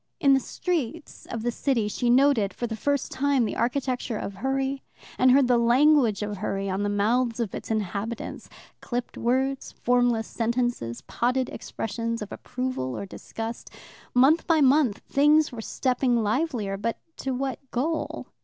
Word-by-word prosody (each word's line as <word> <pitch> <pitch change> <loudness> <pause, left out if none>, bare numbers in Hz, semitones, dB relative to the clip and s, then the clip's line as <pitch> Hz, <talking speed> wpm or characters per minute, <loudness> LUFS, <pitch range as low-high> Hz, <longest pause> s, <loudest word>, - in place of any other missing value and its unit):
In 280 -5 +5
the 270 - +5
streets 325 +1 -4
of 225 -2 -5
the 240 - 0
city 235 -4 0
she 240 +3 -1
noted 250 -5 +4
for 240 - -3
the 225 -1 -3
first 285 +4 -1
time 275 -2 +2
the 210 - -3
architecture 245 -1 -1
of 200 - -5
hurry, 270 +5 -1 0.4
and 255 - +6
heard 265 0 +5
the 245 -1 +4
language 240 -2 +4
of 210 -1 -4
hurry 195 0 -2
on 190 +2 -1
the 205 - 0
mouths 230 +4 +1
of 225 -5 -2
its - - -6
inhabitants 220 +1 -3 0.3
clipped 245 0 -4
words, 265 +3 0
formless 245 -2 +3
sentences, 235 - -2
potted 250 +1 0
expressions 230 0 -4
of 205 - -10
approval 250 - -4
or - - -4
disgust. 225 +4 -7 0.5
Month 275 +7 +5
by 330 -2 +4
month 270 -5 +3
things 295 +2 +4
were 235 -3 -6
stepping 250 0 +1
livelier, 220 -4 -1
but 230 +3 -2 0.2
to 270 - -3
what 265 -1 -2
goal? 310 +6 -2
245 Hz, 160 wpm, -26 LUFS, 225-270 Hz, 0.5 s, and